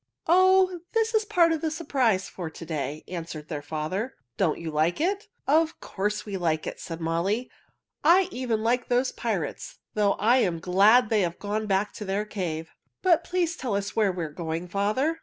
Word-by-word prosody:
"Oh, 370 +1 +4
this 455 0 +1
is 435 -1 +2
part 355 -6 +4
of 320 -2 -1
the 320 - 0
surprise 265 - 0
for 175 -3 -6
to 165 - -10
day," 150 -2 -4
answered 165 -4 -6
their 150 -3 -3
father. 155 - -3 0.2
"Don't 165 -6 +1
you 165 -1 -5
like 155 +3 +1
it?" 390 +6 0 0.2
"Of 320 +3 +2
course 210 +2 -3
we 200 -2 -4
like 160 -3 0
it," - - -5
said 165 -1 -6
Molly. 170 +9 -1 0.5
"I 350 +4 +6
even 235 -4 -1
like 245 +2 +1
those 250 +1 +2
pirates, 200 -10 -3 0.2
though 205 -2 +3
I 235 +5 +3
am 180 -9 +1
glad 205 +7 +5
they 215 -2 +4
have 170 -2 -1
gone 210 +1 -3
back 195 +1 +1
to 210 - -7
their 200 +2 -1
cave. 165 -6 -4 0.3
But 345 -3 +4
please 350 -1 0
tell 245 - -2
us 200 -1 -3
where 210 -3 +3
we 180 -2 -4
are 155 - -7
going, 165 +2 -4
father." 215 - 0
210 Hz, 195 wpm, -26 LUFS, -, 0.5 s, I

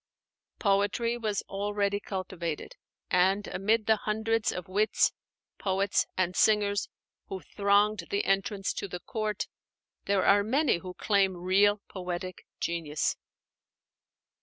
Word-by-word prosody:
Poetry 205 +3 +1
was 215 -4 -2
already 200 0 -1
cultivated: 185 - -5 0.4
and 190 +3 +3
amid 215 +4 +1
the 220 0 +4
hundreds 220 +1 0
of 180 - -6
wits, 205 +4 +2 0.5
poets, 195 0 +1
and 185 -1 0
singers 205 -1 +3 0.4
who 190 -1 -5
thronged 200 +1 +2
the 200 - 0
entrance 195 0 0
to - - -4
the 180 -1 -6
court, 215 0 -2 0.6
there 200 -1 +2
are 200 +1 +6
many 265 - +2
who 180 +1 -8
claim 195 -3 +2
real 200 +3 +3
poetic 180 -1 -6
genius. 160 -3 -1
200 Hz, 115 wpm, -29 LUFS, 185-210 Hz, 0.6 s, are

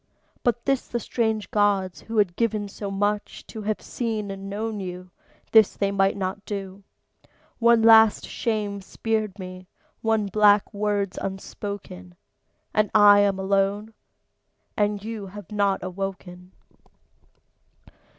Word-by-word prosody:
But 240 -1 0
this 275 -2 0
the 240 - -2
strange 220 -2 -2
gods, 200 -3 +1
who 225 0 -6
had 195 -5 +2
given 215 -3 0
so 200 0 -6
much, 205 +1 -2
To 220 - -8
have 215 0 -3
seen 220 -4 -3
and 195 0 -7
known 215 +1 -3
you, 180 -1 -7 0.4
this 220 -3 +5
they 200 -1 0
might 195 0 +2
not 195 +1 -3
do. 195 -2 -6 0.8
One 235 -1 +5
last 225 -1 +6
shame's 205 -3 -3
spared 215 -1 -2
me, 185 -1 -9 0.3
one 220 -2 +1
black 205 +1 +3
word's 205 -2 -1
unspoken; 190 - -7 0.6
And 215 0 +2
I'm 205 -2 +6
alone; 200 +3 0 0.8
and 205 -1 0
you 220 -2 -6
have 205 +2 -11
not 200 -2 +1
awoken. 185 -1 -6
205 Hz, 125 wpm, -24 LUFS, 195-215 Hz, 0.8 s, last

